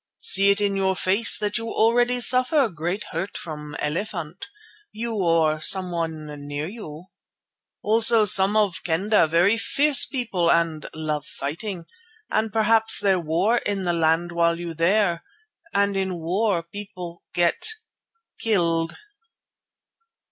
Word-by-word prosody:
See 200 - +4
it 200 +1 +2
in 200 -1 0
your 190 -1 0
face 195 +5 +3
that 210 +2 -2
you 230 0 -6
already 240 +3 +1
suffer 255 +3 +4
great 175 +4 -4
hurt 180 +5 -4
from 150 -2 -8
elephant, 165 +1 -4 0.4
you 230 +1 -5
or 165 -6 +1
someone 165 -4 0 0.2
near 145 +1 -4
you. 180 -6 -10 0.8
Also 225 +1 +5
some 195 +1 +5
of 205 -5 0
Kendah 180 +2 +1
very 175 +7 +2
fierce 290 +4 +3
people 220 -11 -2
and 165 -2 0
love 155 -1 -4
fighting, 170 +5 -6 0.5
and 220 0 0
p'raps 225 +1 +3
there 190 -2 +1
war 170 +8 0
in 200 -2 -3
the 175 -1 0
land 165 +1 0
while 170 0 0
you 170 -1 -6
there, 175 +1 +1 0.5
and 200 0 0
in 190 -2 -2
war 180 +2 -1
people 175 -2 -9
get 175 - +1 0.7
killed." 165 -6 0
185 Hz, 130 wpm, -23 LUFS, 165-215 Hz, 0.8 s, Also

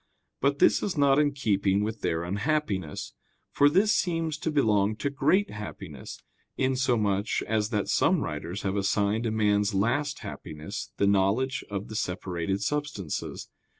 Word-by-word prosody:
But 140 +1 +1
this - - +4
is 190 - -2
not 140 -1 +4
in 145 -1 +3
keeping 100 -7 +1
with 110 +1 -4
their 80 +1 -1
unhappiness: 100 - -2 0.4
for 145 - +5
this 195 +7 +3
seems 165 -3 0
to 160 - -2
belong 110 -8 +2
to 140 +6 -2
great 155 +9 +2
happiness, 105 -1 -8 0.4
insomuch 120 -6 +1
as 110 -1 0
that 105 -4 -1
some - - +3
writers 90 +5 -4
have 95 -1 -1
assigned 100 +3 +1
as - - -1
man's 105 -1 +2
last 135 +9 0
happiness 75 0 -7
the - - +2
knowledge 100 +7 +2
of 100 0 -4
the 110 - -8
separated 90 -1 -2
substances. 140 - -3
110 Hz, 150 wpm, -27 LUFS, 100-140 Hz, 0.4 s, for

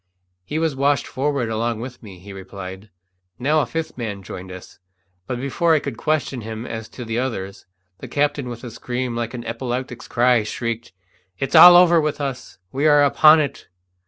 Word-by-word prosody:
"He 150 +12 -4
was 160 -3 0
washed 140 0 +1
forward 135 -3 -2
along 115 0 -1
with 125 +1 -8
me," 100 -5 -11
he 100 +3 -11
replied. 95 +1 -9 0.5
Now 150 +5 +2
a - - -2
fifth 165 -5 -5
man 105 -4 -5
joined 95 0 -8
us, 90 0 -11 0.5
but 125 - -3
before 160 +5 +1
I - - +3
could 140 -4 -5
question 140 -2 -1
him 110 +1 -6
as 110 -2 -6
to 125 - -8
the 115 +1 -2
others, 100 -7 -5 0.3
the - - -8
captain, 145 -3 -1
with 120 0 -8
a 120 - -7
scream 125 +1 -4
like 115 +1 -3
an 120 - -7
epileptic's 120 +1 -4
cry, 120 -1 +3
shrieked, 115 +2 -4 0.5
"It's 135 - -3
all 175 0 +10
over 175 -2 +6
with 150 -1 -2
us! 135 -3 -5
We 140 +3 +1
are 145 -1 +6
upon 155 +2 +6
it!" 145 - -5
125 Hz, 190 wpm, -21 LUFS, 115-145 Hz, 0.5 s, all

